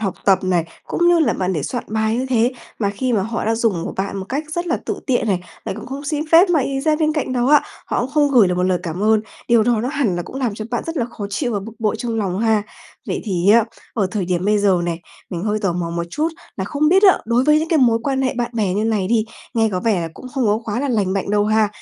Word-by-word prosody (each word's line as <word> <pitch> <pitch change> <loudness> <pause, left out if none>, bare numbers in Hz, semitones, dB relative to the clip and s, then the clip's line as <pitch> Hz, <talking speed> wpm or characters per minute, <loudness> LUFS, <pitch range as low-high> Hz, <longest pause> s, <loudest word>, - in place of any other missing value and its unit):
học 195 -4 -2
tập 195 -2 +5
này, 180 -3 +1 0.2
cũng 345 - +2
như 345 -1 +5
là 315 - +3
bạn 185 0 -1
để 155 -6 -2
soạn 245 - -3
bài 220 +1 0
như 255 +2 -1
thế, 245 -1 +2 0.3
mà 200 -3 0
khi 245 +5 -2
mà 205 - +2
họ 225 +3 -3
đã 225 +1 +1
dùng 220 -7 0
của - - -4
bạn 195 +1 -2
một 190 - -4
cách 285 +4 -2
rất 345 +2 -2
là 335 - +1
tự - - -3
tiện 245 -3 +1
này, 190 -3 +1 0.2
lại - - -3
còn 220 - -8
không 275 +3 -6
xin 300 0 -1
phép 345 +4 +7
mà 325 -4 +3
ì 270 +1 -1
ra 305 +2 +2
bên 310 -1 +1
cạnh 300 -4 -2
đó 245 -1 +1
á, 295 +2 +6 0.3
họ - - -1
cũng 250 +2 -3
không 290 -1 +2
gửi 235 -8 +5
được 180 - 0
một 180 - 0
lời 185 -1 +2
cảm 175 +1 -4
ơn, 220 0 +4 0.3
điều 235 -2 +5
đó 235 -1 +2
nó 245 - -2
hẳn 270 -10 0
là 175 - -2
cũng 180 - -9
làm 250 -6 -1
cho 215 - -6
bạn 240 - -1
rất 330 0 -4
là 245 - +1
khó 210 -4 -6
chịu 240 +4 -1
và 205 - -1
bực 220 +4 -9
bội 220 -1 0
trong 230 -1 -3
lòng 190 -3 -1
ha. 220 -2 +2 0.4
Vậy - - -2
thì 190 -2 +2
á, 230 +1 +6 0.3
ở 205 -5 +1
thời 200 -3 -2
điểm 180 0 -1
bây 210 +1 +3
giờ 195 -3 +3
này, 170 -1 -3 0.3
mình 175 -3 -4
hơi 210 +1 0
tò 195 -4 0
mò 170 -1 -3
một 170 0 -2
chút 305 - 0 0.3
là 190 - -2
không 295 +9 +1
biết 380 +4 +4
á 385 -3 +7
đối 235 +3 +2
với 300 +1 +5
những 320 +1 -2
cái 325 - +3
mối 235 -4 +4
quan 270 0 0
hệ 260 - 0
bạn 240 -1 -1
bè 205 -5 0
như 210 +2 0
này 215 -4 0
đi, 225 -1 +2 0.3
nghe 225 -1 +3
có 180 - -1
vẻ 210 -3 +1
là 165 - -3
cũng - - -10
không 260 -4 +1
có 210 +1 +2
quá 230 +2 -2
là 285 - -1
lành 205 -6 +1
mạnh 195 0 -2
đâu 205 0 +2
ha, 215 0 +3
225 Hz, 305 wpm, -20 LUFS, 195-265 Hz, 0.4 s, phép